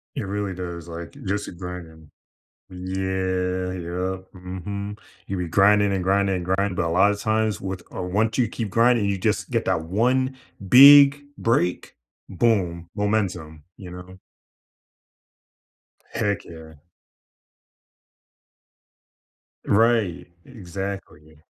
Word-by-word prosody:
It - - -3
really 100 -1 -3
does, 85 -2 -7
like, 85 0 -7
just 100 +1 -2
grinding. 85 -4 -9 0.6
Yeah, 95 0 -2
yeah, 90 +1 -3 0.2
mhm. 100 +3 -6 0.3
You'll 95 -1 -4
be 90 - -3
grinding 100 +4 +4
and 95 -2 -1
grinding 100 0 +2
and 90 -1 -4
grinding, 95 +1 0
but 85 - -1
a - - -1
lot 95 +5 +4
of 100 - -4
times 110 0 0
with 95 -1 -5
or 90 - -5
once 110 +5 0
you 125 - +2
keep 110 -1 -5
grinding, 115 +1 +3
you 100 -1 0
just - - -1
get - - -1
that 80 - 0
1 130 +8 +1 0.3
big 140 +3 +8
break. 90 - -1 0.3
Boom. 90 -5 0
Momentum, 90 -8 -2
you 95 - -10
know? 90 +1 -11 1.9
Heck 105 -3 -2
yeah. 80 -1 -12 2.9
Right, 110 -4 +2 0.2
exactly. 95 - -8
95 Hz, 115 wpm, -23 LUFS, 90-105 Hz, 2.9 s, big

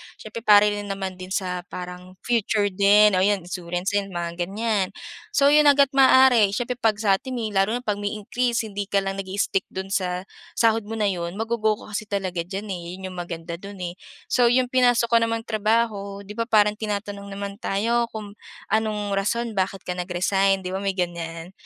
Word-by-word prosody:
siyempre 220 +1 -8
para 210 -2 +6
rin 205 -1 -1
naman 190 -2 -4
din 185 - -7
sa 185 -2 -2
parang 180 0 -8
future 215 -3 +1
din 205 +2 +5
o 185 - +2
yun 195 -1 +2
insurance 180 +1 -3
din 200 -1 0
mga 175 -1 -4
ganyan. 210 -1 0 0.5
So 280 0 +5
yun 300 0 +6
hangga't 280 -2 +5
maaari, 260 -6 +6
syempre 245 0 -3
pag 220 -2 +2
sa'tin, 210 +5 0
eh, 220 -3 -3
lalo 195 +4 +2
na 245 - -4
pag 210 -3 -1
may 205 +1 -2
increase 235 +2 -1
hindi 205 -2 -5
ka 200 -1 +1
lang 195 0 -3
nag 190 - -5
i-stick 195 0 -1
dun 190 +1 -6
sa 180 -1 -1 0.3
sahod 225 -2 +2
mo 225 - -4
na 210 -2 +1
yun 170 0 -4
ma 220 - -2
go-go 220 -2 0
mo 215 - -13
kasi 210 0 -4
talaga 190 -3 -2
dyan 200 +1 -5
eh, 175 0 -6
yun 190 0 -7
yung 180 - -10
maganda 170 0 -6
dun 200 +1 -9
eh. 175 - -3 0.4
So 245 -1 +4
yung 250 +1 +2
pinasok 245 -2 +3
ko 230 - +6
namang 230 0 -1
trabaho 215 -2 -1
di 200 - -10
ba 230 +2 -3
parang 210 -2 +3
tinatanong 205 -1 -4
naman 200 +1 -6
tayo 235 +4 0
kung 210 -2 -9 0.3
anong 215 -2 0
rason 235 +3 -1
bakit 195 -1 -2
ka 180 - -4
nag-resign 190 +2 +1
di 180 - -4
ba 190 - -2
may 195 -1 -2
ganyan. 170 -1 -4
205 Hz, 200 wpm, -24 LUFS, 190-225 Hz, 0.5 s, para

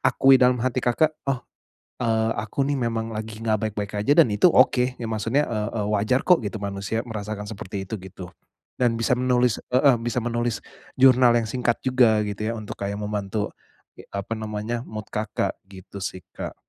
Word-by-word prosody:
akui 135 0 +5
dalam 125 0 +5
hati 130 0 0
Kakak, 150 +6 +2 0.2
"Oh, 130 - -2 0.6
eee, 115 -1 +1
aku 110 +6 -2
nih 140 -1 0
memang 115 0 -3
lagi 110 +1 -6
enggak 110 -1 +1
baik-baik 105 0 -4
aja 125 +8 +3
dan 110 - -3
itu 140 - +5
oke." 125 -2 +3
Ya 115 - -5
maksudnya, 115 +7 +1
e 115 - -3 0.2
e 110 - -1
wajar 110 +5 +1
kok 180 -2 +5
gitu, 105 0 -4
manusia 100 +2 -3
merasakan 105 -2 -5
seperti 100 -1 -6
itu, 105 - -9
gitu. 95 -1 -9 0.5
Dan 120 -2 +2
bisa 115 - 0
menulis 125 -2 +2 0.2
heeh, 135 0 +5
bisa 120 +1 -1
menulis, 120 -1 -1 0.4
jurnal 130 -2 +6
yang 115 -2 +1
singkat 120 -1 -1
juga, 120 -5 +4
gitu 105 +1 -4
ya, 115 - -1
untuk 105 - -7
kayak 100 0 -3
membantu, 105 0 -3 0.4
ge - - -12
apa 100 +3 -4
namanya, 110 +2 -4
mood 110 -4 -8
Kakak, 105 0 -2
gitu 100 +1 -11
sih, 95 - -4 0.2
Kak. - - -5
110 Hz, 185 wpm, -24 LUFS, 105-125 Hz, 0.6 s, jurnal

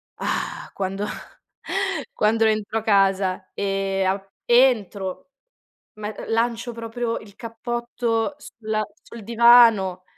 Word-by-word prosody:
"Ah!" - - -3
Quando 195 +1 -3 1.1
quando 225 +1 +2
rientro 215 0 0
casa 195 -2 +1
e 195 -1 -1
a 190 +1 0 0.2
entro, 220 -6 +2 0.6
me 210 0 -6
uhm, - - -7
lancio 235 +1 0
proprio 230 0 -3
il 205 -2 -15
cappotto 235 +2 -3
sul 220 -6 -5 0.2
sul 235 -2 -11
divano 230 -5 +5
220 Hz, 100 wpm, -23 LUFS, 195-235 Hz, 1.1 s, divano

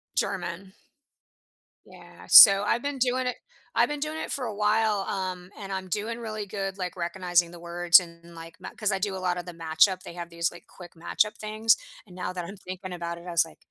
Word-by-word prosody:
German. 185 0 -3 1.1
Yeah, - - -15
so 195 -1 +10
I've 230 +3 0
been 285 -1 -3
doing 255 0 0
it 250 - -2 0.4
I've - - +3
been 295 0 -4
doing 305 +2 -4
it - - -5
for 265 - -3
a 220 - -4
while, 210 0 +2
um, 185 -2 -4
and 195 -1 -7
I'm 190 -1 -4
doing 215 +5 -3
really 215 -2 -5
good, 195 -1 -5
like, 180 -2 -4
recognizing 175 -1 0
the 175 0 -12
words 175 +1 +5
and, 170 -1 -13
like, 165 0 -10
ma - - -7
‘cause 210 -1 +1
I 195 - -1
do 195 0 -2
a - - -4
lot 180 -1 -1
of 175 - -7
the - - -5
matchup, 165 +3 +2
they 170 - -9
have 170 -1 -7
these, 170 0 -2
like, 175 - -14
quick 175 -2 -13
matchup 195 +5 -1
things, 215 +1 +2 0.3
and 180 -4 -16
now 180 0 -4
that 180 -2 -5
I'm 195 +4 -9
thinking 185 -1 -8
about 170 -1 -5
it, 170 - -13
I - - -5
was 170 0 +4
like, 165 - -14
185 Hz, 230 wpm, -26 LUFS, 175-210 Hz, 1.1 s, so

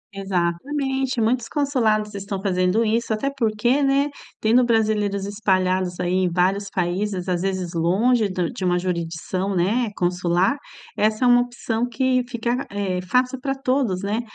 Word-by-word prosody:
Exatamente! 250 +9 -1
Muitos 230 +2 +1
consulados 225 -8 +1
estão 200 -1 -4
fazendo 190 +3 +1
isso, 225 +1 0
até 245 +6 0
porque, 240 +3 +1
né, 280 +1 +2 0.3
tendo 230 +3 +4
brasileiros 215 -4 +1
espalhados 185 -3 0
aí 175 0 -1
em 185 -1 +2
vários 190 +3 +1
países, 185 +1 -2
às 180 -2 0
vezes 185 -2 -2
longe 205 +7 +2
do 180 -2 -1
de - - -6
uma 180 -1 +2
jurisdição, 180 +2 -2
né, 215 +7 +1
consular. 180 +4 +1 0.4
Essa 215 +3 +1
é - - +5
uma 245 0 +6
opção 240 -1 -2
que 255 +1 +1
fica, 240 +2 -2
eh, 195 -3 -2
fácil 250 +7 0
pra 270 +1 -1
todos, 255 -8 0
né? 205 +3 -1
210 Hz, 150 wpm, -22 LUFS, 185-245 Hz, 0.4 s, uma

